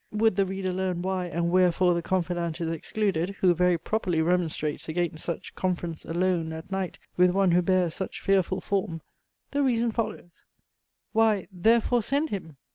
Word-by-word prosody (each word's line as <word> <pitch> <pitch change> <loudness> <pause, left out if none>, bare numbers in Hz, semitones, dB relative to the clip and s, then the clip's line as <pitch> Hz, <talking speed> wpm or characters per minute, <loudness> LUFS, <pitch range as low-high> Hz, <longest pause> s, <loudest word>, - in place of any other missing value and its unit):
Would 215 -1 +2
the 195 -1 +2
reader 190 0 -2
learn 180 -1 -2
why 185 -1 -1
and 170 +1 -1
wherefore 180 0 +4
the 170 - 0
confidante 175 -2 -1
is 165 - -1
excluded, 190 +2 -1
who 180 -2 +5
very 180 0 +3
properly 180 -2 -1
remonstrates 160 -3 0
against 165 -1 -2
such 170 - -5
"conference, 175 -3 -3
alone, 170 -1 0
at 160 +4 -9
night, 190 -2 -2 0.2
with 180 0 +6
one 190 0 +3
who 175 +1 +4
bears 180 -2 +2
such 190 - -5
fearful 190 -1 +1
form;" 180 -5 -2 0.5
the 285 - 0
reason 235 -3 +2
follows 215 -6 -5 0.7
"why, 220 -4 +2
therefore 230 +6 +3
send 285 +8 0
him!" 165 -7 -5
180 Hz, 165 wpm, -27 LUFS, 170-195 Hz, 0.7 s, with